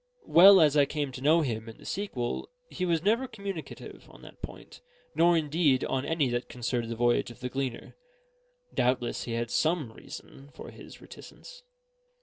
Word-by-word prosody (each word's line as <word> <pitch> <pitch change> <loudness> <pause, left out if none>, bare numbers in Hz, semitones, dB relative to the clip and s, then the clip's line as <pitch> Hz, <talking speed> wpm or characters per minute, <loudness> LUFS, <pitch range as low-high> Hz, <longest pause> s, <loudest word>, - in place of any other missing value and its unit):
Well 190 +3 +8
as 150 -2 +4
I 145 -1 +5
came 145 -1 -3
to 130 - -9
know 155 +4 +4
him 115 -5 -3
in 110 - -12
the - - -16
sequel, 130 -12 -4 0.2
he 185 - -2
was 165 -2 0
never 230 +6 +2
communicative 200 -8 -8
on - - -16
that - - -14
point, - - -10 0.3
nor 170 +2 +4
indeed 150 -3 +1
on 135 +1 -2
any 160 -2 +1
that 120 0 -3
concerned 120 -1 -3
the 115 - -3
voyage 120 +1 +1
of 120 - -13
the 125 0 -4
Gleaner. 135 -2 -5 0.8
Doubtless 125 -1 0
he 115 - -4
had 120 0 -3
some 155 -7 0
reason 140 +4 -12
for - - -10
his - - -13
reticence. - - -13
145 Hz, 175 wpm, -28 LUFS, 120-170 Hz, 0.8 s, Well